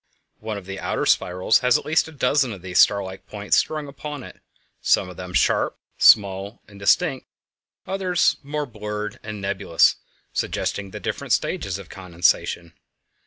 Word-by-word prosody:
One 110 -1 -4
of 100 - -9
the 95 0 -6
outer - - -2
spirals 90 +4 +3
has 125 -1 +4
at - - -8
least 160 +1 +2
a - - -10
dozen 140 -3 +1
of 95 -3 -11
these 90 -1 0
star 100 -1 +5
like 95 0 -9
points 105 -1 0
strung 155 -2 0
upon 145 0 -7
it; - - -13 0.4
some - - +2
of 90 - -10
them 90 0 -7
sharp, - - +1 0.2
small, 100 +1 +4
and 100 -1 -14
distinct, 135 - +2 0.6
others 185 -2 +1
more 150 +1 -3
blurred 105 -3 -6
and 105 -1 -7
nebulous, 100 -3 +2 0.4
suggesting 100 -1 -2
different - - -3
stages 95 -1 -1
of 100 -4 -11
condensation. 85 -2 0
105 Hz, 160 wpm, -23 LUFS, 95-140 Hz, 0.6 s, star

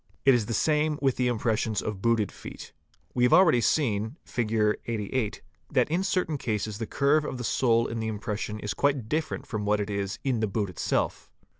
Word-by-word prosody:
It 135 - +7
is 120 -4 +1
the 115 - -2
same 150 +3 +2
with 135 -2 +1
the 125 - +2
impressions 110 -2 0
of 105 -3 -4
booted 115 -3 +2
feet. - - -10 0.4
We 125 - -1
have 125 - +4
already 165 -10 +6
seen 110 0 +1
(Fig. 115 -4 -2 0.4
88) 115 0 -2 0.3
that - - +2
in 175 +3 +1
certain 180 -6 0
cases 105 -2 -2
the 115 - -3
curve 145 +2 +2
of 130 - -4
the 125 - -5
sole 115 -1 +2
in 115 - -3
the 110 - -2
impression 105 0 -3
is 105 -3 -2
quite 140 -1 0
different 155 +6 -2
from 105 -5 -4
what 105 0 +2
it 105 0 -2
is 100 +1 -2
in 130 -4 0
the 110 - +1
boot 100 -1 -2
itself. - - -1
115 Hz, 200 wpm, -27 LUFS, 105-135 Hz, 0.4 s, It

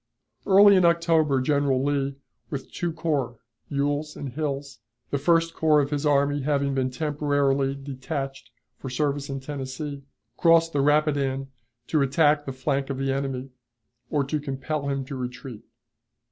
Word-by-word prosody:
Early 200 0 +7
in 185 - +4
October 165 -4 +3
General 140 -1 +1
Lee, 140 -1 0 0.3
with 140 -3 -6
two 175 -1 -2
corps 150 -7 -2 0.3
(Ewell's 145 +2 -1
and 140 - -5
Hill's), 140 0 -4 0.3
the 140 - 0
First 165 +2 +2
Corps 155 -2 +3
of 145 0 0
his 145 +1 0
army 145 0 +2
having 140 0 0
been 130 -1 0
temporarily 140 -1 0
detached 135 0 -5 0.3
for 135 - -6
service 140 +2 -1
in 135 -1 -4
Tennessee, 140 +1 -5 0.4
crossed 165 -1 +4
the 140 - +2
Rapidan 140 -2 +1 0.4
to 155 +2 +1
attack 145 +2 +3
the 135 - -4
flank 135 +1 -2
of 135 - -3
the 135 0 0
enemy, 135 -1 -3 0.6
or 145 -2 +1
to 150 +3 -2
compel 140 +1 -3
him 135 -1 -2
to 135 - -6
retreat. 125 -2 -7
140 Hz, 150 wpm, -25 LUFS, 135-150 Hz, 0.6 s, Early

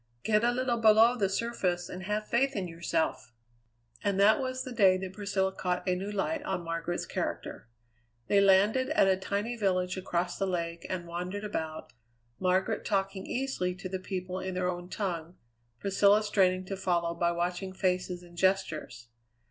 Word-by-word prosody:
Get 215 +1 +2
a 240 - +4
little 245 -1 0
below 225 +2 +6
the 200 -5 +1
surface, 190 -5 -1
and 180 - -7
have 210 +1 -2
faith 270 +4 +1
in 190 -3 -2
yourself." 165 -6 -2 0.7
And 200 -1 +1
that 210 +5 +6
was 255 -1 -2
the 255 - -7
day 195 -6 +5
that 185 0 -6
Priscilla 200 -2 0
caught 180 0 -2
a 180 - +2
new 195 +3 -4
light 285 +10 -1
on 295 -12 -3
Margaret's 165 +1 -3
character. - - -4 0.6
They 200 -1 +4
landed 205 +7 +4
at 310 -10 +4
a 190 - +4
tiny 200 +5 -2
village 185 -4 0
across 175 -1 -2
the 195 - +1
lake 170 -2 -3
and 180 -2 -3
wandered 180 +4 -4
about, 160 -6 -4 0.5
Margaret 185 +4 +1
talking 195 -1 -1
easily 245 -9 -1
to 185 +1 -6
the 190 0 -4
people 185 -1 -4
in 185 -1 -4
their 180 0 0
own 175 0 -7
tongue, 175 -5 -3 0.4
Priscilla 200 +2 +4
straining 185 -3 +2
to 195 - -4
follow 175 -3 0
by 170 0 +1
watching 180 +2 -2
faces 180 -1 -1
and 175 -1 -15
gestures. 170 - 0
190 Hz, 170 wpm, -30 LUFS, 180-210 Hz, 0.7 s, below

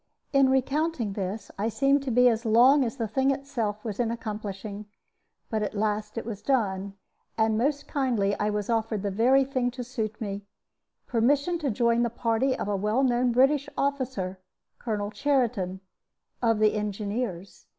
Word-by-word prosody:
In 275 -1 +5
recounting 265 -3 0
this 195 +2 -4
I 215 +3 +1
seem 275 +4 +3
to 275 -1 -5
be 250 +1 +5
as 230 -1 +2
long 250 +5 +5
as 235 +1 -3
the 230 -3 -1
thing 265 +6 +1
itself 240 -7 -2
was 215 -1 -4
in 235 -2 +1
accomplishing. 210 -2 -5 0.6
But 220 -1 0
at 210 - -3
last 210 +1 -1
it 230 - -3
was 215 -3 -6
done, 200 -6 0 0.4
and 220 -1 +2
most 285 +5 0
kindly 235 -8 0
was 210 -1 -1
I 235 - +1
offered 220 -2 -1
the 200 - -1
very 250 +7 +4
thing 255 -2 0
to 250 0 -6
suit 225 -4 -4
me 200 -2 -4 0.6
permission 285 +8 +1
to 295 -4 -1
join 235 +1 +2
the 240 - +1
party 235 +3 0
of - - -3
a 205 - 0
well 210 +7 +1
known 245 -1 +2
British 270 +4 +3
officer, 260 -10 -2 0.4
Colonel 210 -3 -3
Cheriton, 230 -9 0 0.6
of 225 -2 +3
the 215 0 +3
Engineers. 205 -2 -4
230 Hz, 170 wpm, -27 LUFS, 210-260 Hz, 0.6 s, In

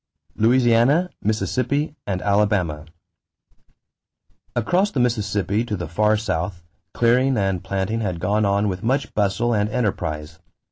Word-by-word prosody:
=Louisiana, 125 +8 +3
Mississippi, 130 +7 -1
and 95 -2 -2
Alabama.= 100 -7 +1 1.7
Across 180 - +1
the 135 - -1
Mississippi 105 -3 0
to 105 -4 -3
the 85 -1 -5
far 105 +6 +2
south, 90 -4 -3 0.3
clearing 125 +2 +3
and 95 -3 0
planting 100 +4 -2
had 90 -5 -2
gone 100 +5 +1
on 100 +1 +2
with 90 -2 -3
much 130 +5 -1
bustle 105 +4 +1
and 105 -1 +1
enterprise. 80 -9 -3
105 Hz, 125 wpm, -22 LUFS, 95-120 Hz, 1.7 s, =Louisiana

